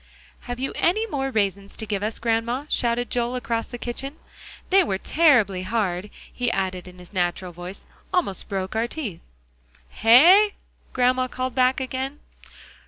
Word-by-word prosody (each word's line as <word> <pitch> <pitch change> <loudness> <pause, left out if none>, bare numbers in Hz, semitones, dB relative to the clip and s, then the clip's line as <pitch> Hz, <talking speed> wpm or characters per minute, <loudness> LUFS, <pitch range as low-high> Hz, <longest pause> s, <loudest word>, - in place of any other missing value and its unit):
"Have 245 0 -4
you 270 - -2
any 430 +6 +2
more 275 -10 -2
raisins 200 -4 -1
to 220 - -4
give 200 -2 -2
us, 215 +2 -2
Grandma?" 235 +4 -1
shouted 240 0 0
Joel 245 0 0
across 230 -2 -2
the 245 - -7
kitchen. 265 +4 -4 0.6
"They 385 0 +6
were 190 - -1
terribly 235 - +3
hard," 190 -1 -2 0.2
he 245 -1 0
added 185 -4 -2
in 180 0 -13
his 180 +2 -14
natural 180 0 -1
voice; 175 +3 -9 0.3
"almost 340 - 0
broke 190 0 -3
our 225 +1 +1
teeth." 240 - -5 0.7
"Hey?" 345 - +6 0.4
called - - -30 0.3
Grandma 255 0 -3
back 255 +1 +2
again. 265 +2 -4
235 Hz, 155 wpm, -24 LUFS, 195-265 Hz, 0.7 s, They